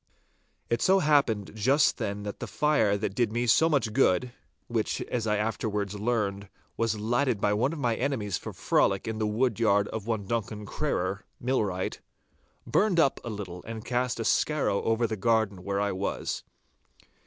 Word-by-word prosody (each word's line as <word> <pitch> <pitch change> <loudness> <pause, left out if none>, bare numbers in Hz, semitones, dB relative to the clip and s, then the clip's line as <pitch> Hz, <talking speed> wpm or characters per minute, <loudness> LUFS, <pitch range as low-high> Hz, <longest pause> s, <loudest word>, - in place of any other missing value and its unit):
It 115 - 0
so 190 +1 +5
happened 140 - +2
just 130 +7 +3
then 100 +1 -3
that 105 0 -6
the - - -5
fire 145 -10 +2
that 100 -1 -3
did 120 -1 +1
me 120 +2 0
so 160 +8 +4
much 125 -8 +1
good—which, 120 0 -1
as 115 -3 -2
I 105 -1 +2
afterwards 105 -2 -2
learned, 105 -2 -1 0.3
was 115 -2 0
lighted 120 +1 +1
by 105 +1 +2
one 120 +7 +1
of 165 - -5
my 120 -5 0
enemies 115 -7 -1
for - - -5
frolic 95 +2 +1
in 110 -1 -3
the 110 - +1
wood 115 +1 0
yard 105 -3 +3
of 110 -1 -5
one 110 -3 -1
Duncan 105 -1 -3
Crerar, - - -2 0.2
millwright—burned 130 - -2
up 140 - +3
a - - -5
little 95 -5 -6
and 115 -1 -6
cast 125 -1 -1
a 115 - -2
skarrow 150 -9 +1
over 115 +1 +1
the 110 -1 -2
garden 110 -3 +1
where 100 0 -1
I 100 0 +1
was. 95 +2 -3
110 Hz, 170 wpm, -28 LUFS, 100-125 Hz, 0.3 s, so